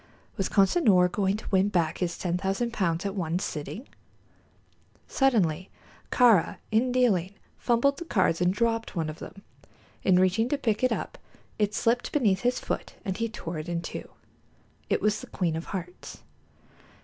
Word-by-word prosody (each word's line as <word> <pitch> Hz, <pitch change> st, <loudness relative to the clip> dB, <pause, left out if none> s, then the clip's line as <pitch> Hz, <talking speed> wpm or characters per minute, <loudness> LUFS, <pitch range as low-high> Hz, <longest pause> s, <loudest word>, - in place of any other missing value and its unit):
Was 195 Hz, -4 st, -1 dB
Consinor 195 Hz, -, +4 dB
going 195 Hz, +1 st, 0 dB
to -, -, -10 dB
win 195 Hz, +1 st, +3 dB
back 170 Hz, -5 st, 0 dB
his 175 Hz, -2 st, -2 dB
ten 175 Hz, -1 st, -1 dB
thousand 195 Hz, +6 st, -1 dB
pounds 170 Hz, -4 st, 0 dB
at 200 Hz, -, -2 dB
one 175 Hz, -4 st, -1 dB
sitting? 185 Hz, -, -5 dB, 1.2 s
Suddenly 195 Hz, -, +1 dB, 0.4 s
Kāra, 230 Hz, -9 st, +4 dB
in 235 Hz, +4 st, +2 dB
dealing, 205 Hz, -7 st, +2 dB, 0.2 s
fumbled 260 Hz, +4 st, +2 dB
the 340 Hz, -, -6 dB
cards 185 Hz, -, +1 dB
and 180 Hz, 0 st, +3 dB
dropped 230 Hz, +2 st, -1 dB
one 160 Hz, -3 st, -1 dB
of 155 Hz, -, -13 dB
them. 195 Hz, +1 st, -10 dB, 0.6 s
In 185 Hz, -1 st, +4 dB
reaching 185 Hz, +6 st, +2 dB
to 290 Hz, -, +1 dB
pick 225 Hz, -4 st, -1 dB
it 255 Hz, -, +3 dB
up -, -, -4 dB, 0.4 s
it 210 Hz, 0 st, +1 dB
slipped 235 Hz, +3 st, +1 dB
beneath 215 Hz, -11 st, +2 dB
his 245 Hz, +3 st, 0 dB
foot -, -, -4 dB
and 190 Hz, -2 st, -2 dB
he 230 Hz, +1 st, -1 dB
tore 170 Hz, -7 st, -6 dB
it 155 Hz, +3 st, -6 dB
into 170 Hz, 0 st, -4 dB
two. -, -, -16 dB, 0.8 s
It -, -, +1 dB
was 210 Hz, 0 st, +1 dB
the -, -, -10 dB
queen 170 Hz, -4 st, -1 dB
of 165 Hz, -, -4 dB
hearts. 180 Hz, -2 st, -7 dB
195 Hz, 170 wpm, -27 LUFS, 180-230 Hz, 1.2 s, Consinor